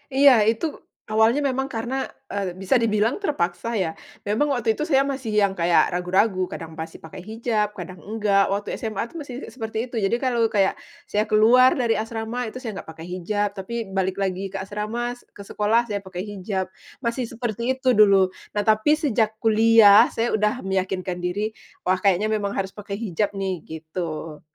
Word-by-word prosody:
Iya, 280 0 +8 0.2
itu 230 +8 0 0.5
awalnya 220 +6 +4
memang 265 +1 -1
karena, 235 +4 -3 0.4
eee, 190 -3 -3
bisa 195 +7 +2
dibilang 220 +1 +2
terpaksa 230 - -1
ya. 165 -4 -1 0.3
Memang 215 +9 +1
waktu 225 -2 +1
itu, - - -7
saya 275 0 +4
masih 265 -4 -3
yang 195 -1 +2
kayak 170 -1 +3
ragu-ragu, 185 +1 +1
kadang 165 -1 -7
masih 160 0 -7
pakai 185 +3 -9
hijab, 220 -2 0
kadang 180 -1 -8
enggak. 205 -1 +1
Waktu 200 +1 -2
SMA 220 0 -2
tuh 335 - -10
masih 255 -4 -8 0.2
seperti 220 -3 -5
itu, 240 - -9
jadi 195 +4 +2
kalau 240 -3 +1
kayak, 195 -2 +2 0.3
saya 210 +2 -1
keluar 235 +5 +6
dari 235 -3 +2
asrama, 225 +2 -3
itu 255 - -9
saya 230 -5 -5
enggak - - -15
pakai 160 +1 -9
hijab. 200 +3 -1
Tapi 195 +5 -6 0.2
balik 190 0 0
lagi 195 0 -2
ke - - -3
asrama, 215 +5 -3
se 245 - -18
ke 200 - -13
sekolah 225 +4 +1
saya 200 -1 -2
pakai 190 0 -6
hijab, 195 -2 -3 0.4
masih 235 0 -1
seperti 235 +2 -2
itu 260 -1 +2
dulu. 195 -3 +5 0.2
Nah, 205 - +2
tapi 220 +8 +4
sejak 225 -8 0
kuliah, 220 -2 +6
saya 230 +1 -1
udah 210 +1 0
meyakinkan 185 -1 -2
diri, 205 +5 -2 0.3
"Wah 185 0 +1
kayaknya 200 +1 +3
memang 205 -1 -1
harus 190 -1 -2
pakai 200 -1 -6
hijab 205 -2 -1
nih," 190 -4 -2
gitu. 160 -1 -6
210 Hz, 180 wpm, -23 LUFS, 190-230 Hz, 0.5 s, Iya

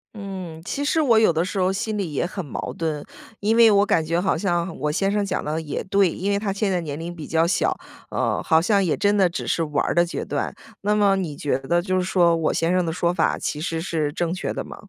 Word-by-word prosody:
嗯， 190 -5 -7
其 280 - -3
实 315 +2 +2
我 235 -7 +4
有 220 -6 +5
的 165 +2 0
时 190 +2 -3
候 185 0 +2
心 215 +2 -2
里 185 -6 -2
也 145 - 0
很 185 +1 -5
矛 145 - -5
盾， 155 -3 -3 0.4
因 215 +2 +2
为 230 -1 +7
我 205 -1 +4
感 165 - +2
觉 165 +2 0
好 190 +2 +1
像 175 -3 -1
我 150 - 0
先 195 +5 0
生 205 0 +1
讲 190 -2 -2
的 155 +2 -2
也 150 - -4
对。 195 0 +3
因 195 +5 -2
为 200 - +1
他 205 -1 -2
现 195 0 -1
在 180 -2 0
年 150 -1 -5
龄 170 +1 -6
比 155 -4 -8
较 165 +1 +2
小， 170 - +1 0.3
呃， - - -1
好 160 -2 +4
像 200 +3 +2
也 170 -5 0
真 205 +2 +2
的 190 -3 +4
只 170 - -5
是 165 - 0
玩 150 -2 0
儿 - - 0
的 175 - +4
阶 175 - -4
段。 - - -2 0.3
那 210 +1 +1
么 200 -2 +4
你 175 -7 -3
觉 140 -3 -1
得 155 +6 +1
就 185 0 -1
是 185 - +2
说 175 -2 +3
我 160 -2 0
先 165 +2 +1
生 185 - +2
的 165 - -2
说 170 +1 0
法 170 - +1
其 150 - -3
实 165 -1 -2
是 160 -4 -1
正 170 +2 -2
确 185 - -3
的 - - -4
吗？ - - -9
180 Hz, 290 characters per minute, -23 LUFS, 165-200 Hz, 0.4 s, 为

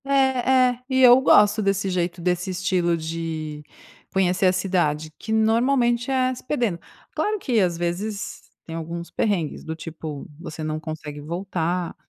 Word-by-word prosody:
É, 275 - -1 0.6
é, 245 - -8
e 260 0 +1
eu 250 +1 +8
gosto 210 -4 +5
desse 195 -1 0
jeito, 175 -1 -2
desse 180 +2 0
estilo 180 -2 0
de 160 -2 -5 0.5
conhecer 185 0 +2
a 185 - +4
cidade, 160 -5 0
que, 220 - -7
normalmente, 235 +2 +2
é 255 -1 +2
se 250 - -10
perdendo. 240 - -1 0.4
Claro 425 0 0
que, 250 - 0
às 175 -4 +1
vezes, 190 +5 -3 0.2
tem 165 - -7
alguns 170 +1 -6
perrengues, 180 -9 -1
do 160 - -5
tipo, 160 -3 -7
você 160 -2 -7
não 155 0 -2
consegue 155 -2 -7
voltar, 175 +1 -2
180 Hz, 155 wpm, -23 LUFS, 165-220 Hz, 0.6 s, eu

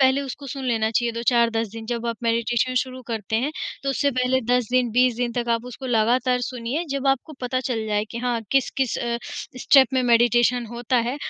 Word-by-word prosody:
पहले 265 +1 +4
उसको 275 +1 -7
सुन 270 0 -6
लेना 225 -3 +1
चाहिए 235 +1 0
2-4-10 230 -1 +1
दिन 225 -1 -8
जब 235 0 -3
आप 230 - -2
मेडिटेशन 235 +2 +1
शुरू 255 0 -9
करते 220 -2 -2
हैं 295 - -2 0.3
तो 275 - 0
उससे 280 +1 +1
पहले 255 0 +1
10 245 -1 +1
दिन, 250 -1 +2
20 250 +1 +3
दिन 240 0 -1
तक 240 0 -2
आप 230 +1 0
उसको 250 +2 -8
लगातार 245 +2 +2
सुनिए, 250 +6 -3
जब 275 0 -2
आपको 270 +3 0
पता 255 0 -1
चल 235 -4 -2
जाए 210 0 0
कि 235 - -5
हाँ 240 -2 0
किस-किस 265 -1 +1
अ, 235 0 -2 0.4
स्टेप 265 +1 +6
में 260 - +2
मेडिटेशन 240 0 +3
होता 240 +2 -2
है, 275 - -4
245 Hz, 205 wpm, -23 LUFS, 230-255 Hz, 0.4 s, स्टेप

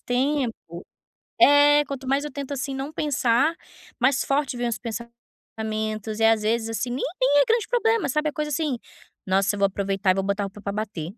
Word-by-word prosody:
tempo 260 -1 0 0.9
É, 290 +1 +6
quanto 270 -1 -7
mais 275 +2 +1
eu 295 - -5
tento, 280 +1 -5
assim, 270 0 -3
não 270 +3 -5
pensar, 280 0 +1 0.5
mais 255 +2 +2
forte 275 -2 0
vem 240 0 -1
os 230 - -2
pensamentos, 220 -2 -6
e - - +3
às 225 -1 +4
vezes, 225 +1 0
assim, 225 +2 -2
nem 250 +3 -3 0.2
nem 285 +2 +5
é - - +3
grande 455 -1 +1
problema, 455 -2 +1
sabe, 300 +3 0
e - - -6
coisa, 300 0 -3
assim: 285 -4 -1 0.5
"Nossa, 195 +2 +2
eu - - -6
vou 200 - +4
aproveitar 195 0 0
e - - +3
vou 195 - -1
botar 200 +1 -1
roupa 200 +1 -7
para 200 - -3
bater", 200 -6 -4
245 Hz, 200 wpm, -24 LUFS, 215-285 Hz, 0.9 s, É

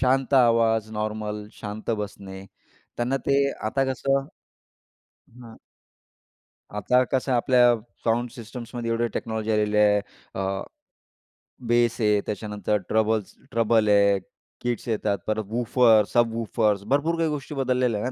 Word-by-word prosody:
शांत 135 +1 +2
आवाज, 115 -3 +3
नॉर्मल 105 -1 -4
शांत 105 +2 -6
बसणे, 95 -1 -9 0.5
त्यांना 125 +3 0
ते 140 0 +3 0.2
आता 135 +5 +1
कसं 135 +1 +1 1.1
हं. 115 -1 -14 1.2
आता 125 +5 +3
कसं 130 0 0
आपल्या 120 0 +4 0.3
साउंड 120 +1 +1
सिस्टम्समध्ये 120 0 -7
एवढे 115 +1 +1
टेक्नॉलॉजी 110 -1 -3
आलेली 105 0 +1
आहे. 105 -1 +4 0.3
अ, 95 0 -2 1.1
बेस 120 0 +2
आहे. 105 -1 +3
त्याच्यानंतर 105 0 -2
ट्रबल्स 110 -2 +1 0.2
ट्रबल 115 -1 +2
आहे, 100 -1 +4 0.4
किट्स 120 0 -3
येतात. 105 -2 0
परत 110 -1 -1
वूफर्स, 115 -2 +3
सब 120 -1 +3
वूफर्स 110 -3 0
भरपूर 160 +4 +1
काही 165 -1 +1
गोष्टी 150 0 -5
बदललेल्या 125 -4 0
आहेत 125 - -1
115 Hz, 125 wpm, -25 LUFS, 105-125 Hz, 1.2 s, आपल्या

